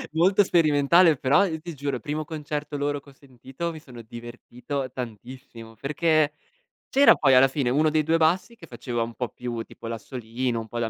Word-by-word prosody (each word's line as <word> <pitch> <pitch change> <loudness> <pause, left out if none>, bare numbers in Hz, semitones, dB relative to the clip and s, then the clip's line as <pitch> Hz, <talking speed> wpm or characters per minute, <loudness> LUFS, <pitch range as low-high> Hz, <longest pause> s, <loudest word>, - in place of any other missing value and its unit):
Molto 190 +5 +4
sperimentale, 160 -1 +4
però 140 +9 +3
io 160 -3 -4
ti 170 +1 -8
giuro 140 -1 -3
il 120 - -6
primo 150 +1 -3
concerto 150 -1 -5
loro 145 0 -1
che 140 - -19
ho - - -17
sentito, 135 +5 -7
mi 160 - -9
sono 125 -6 -12
divertito 120 +3 -7
tantissimo, 120 -1 -9
perché 150 +4 +1 0.5
c'era 280 +1 +6
poi 135 -3 +3
alla 130 +1 +7
fine 135 -2 -1
1 155 +3 +3
dei 155 0 +1
2 165 +2 +2
bassi 180 +8 +1
che 165 -6 -14
faceva 120 -3 -4
un 115 0 -4
po' 125 -2 -3
più 120 0 -5
tipo 115 - -11
l'assolino, 115 +1 -4
un 110 - -7
po' 120 - -7
la 115 -1 -1
140 Hz, 200 wpm, -25 LUFS, 120-155 Hz, 0.5 s, alla